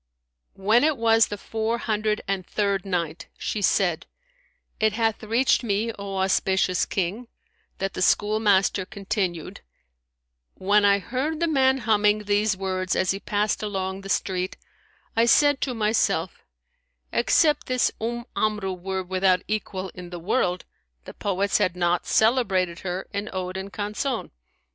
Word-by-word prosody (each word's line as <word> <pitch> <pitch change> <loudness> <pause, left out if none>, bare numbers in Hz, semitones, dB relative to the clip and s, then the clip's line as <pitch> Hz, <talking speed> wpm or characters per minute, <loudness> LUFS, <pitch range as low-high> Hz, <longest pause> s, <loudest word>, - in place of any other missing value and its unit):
When 215 +6 +3
it 310 -2 +2
was 225 -1 +4
the 205 - -5
Four 225 +3 -2
Hundred 215 -2 -1
and 195 -1 -1
Third 200 +1 -1
Night, 170 -4 -3
She 215 - -3
said, 180 -3 +1 0.7
It 220 -1 +2
hath 225 -1 0
reached 230 +4 +2
me, 220 +1 0
O 200 -2 -6
auspicious 190 -1 +1
King, 195 +6 -2 0.5
that 195 0 -3
the - - -4
schoolmaster 205 -1 +3
continued, 190 -4 -4 0.5
" - - -56
When 205 +2 +3
I 200 0 +5
heard 260 - -3
the 335 - +1
man 265 -4 +3
humming 210 -3 +2
these 205 -1 +1
words 185 -1 -2
as 185 - +2
he 195 - -3
passed 205 +1 -1
along 190 -2 -3
the 195 - -9
street, 185 -1 -1 0.6
I 230 +1 +3
said 290 +2 +4
to 255 -3 -1
myself 220 0 0 0.7
Except 300 -3 +2
this 255 -1 +2
Umm 235 +1 -3
Amru 210 -3 0
were 190 +1 -4
without 185 0 +1
equal 195 -3 -3
in 180 -1 -10
the 175 - -6
world, 180 0 0 0.4
the - - -9
poets 200 0 0
had 180 - +1
not 175 -1 0
celebrated 195 -7 +2
her 185 0 -4
in 200 +1 -3
ode 185 -1 -4
and 190 +1 -5
canzon.' 215 +5 -3
200 Hz, 150 wpm, -24 LUFS, 185-220 Hz, 0.7 s, I